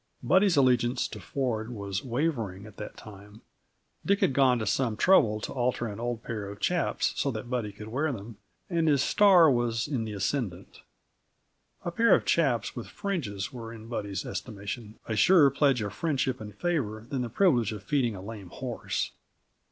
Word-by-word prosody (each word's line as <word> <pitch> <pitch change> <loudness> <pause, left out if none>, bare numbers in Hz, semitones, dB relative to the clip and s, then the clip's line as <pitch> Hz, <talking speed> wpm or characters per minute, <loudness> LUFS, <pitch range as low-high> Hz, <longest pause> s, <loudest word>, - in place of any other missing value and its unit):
Buddy's 190 -3 +4
allegiance 125 -2 +3
to 110 - -8
Ford 110 +1 -2
was 100 -4 -4
wavering, 120 - -2
at 105 -1 -13
that 105 - -8
time. 105 +1 -13 0.6
Dick 200 +1 +2
had - - +3
gone 130 -2 +4
to 110 - -2
some 115 +1 0
trouble 110 - +4
to - - -5
alter 125 -1 0
an 105 -1 -5
old 120 -1 -3
pair 105 -4 -4
of 100 0 -9
chaps 175 -1 0
so 140 - 0
that 120 0 -5
Buddy 115 -5 -1
could 105 +2 -10
wear 145 +6 0
them, 110 -2 -8 0.3
and 165 -3 0
his 140 -3 +4
star 185 -7 +6
was 120 -2 0
in 135 -6 -1
the 110 -1 -5
ascendant; 100 -2 -3 1.0
a 175 - -1
pair 230 +6 +5
of - - -1
chaps 135 -8 +1
with 120 - -6
fringes 140 - -4
were, 115 -2 -7
in 110 -1 -10
Buddy's 100 -5 -3
estimation, 105 0 -6
a 110 - -2
surer 145 - +6
pledge 135 -4 +2
of 100 -1 -4
friendship 130 -3 -1
and 105 -1 -8
favor 115 -11 -2
than 130 -1 -2
the 120 - -3
privilege 120 - +3
of 105 -3 -7
feeding 125 -4 0
a 95 - -8
lame 100 -3 -8
horse. - - -3
120 Hz, 185 wpm, -28 LUFS, 105-140 Hz, 1.0 s, star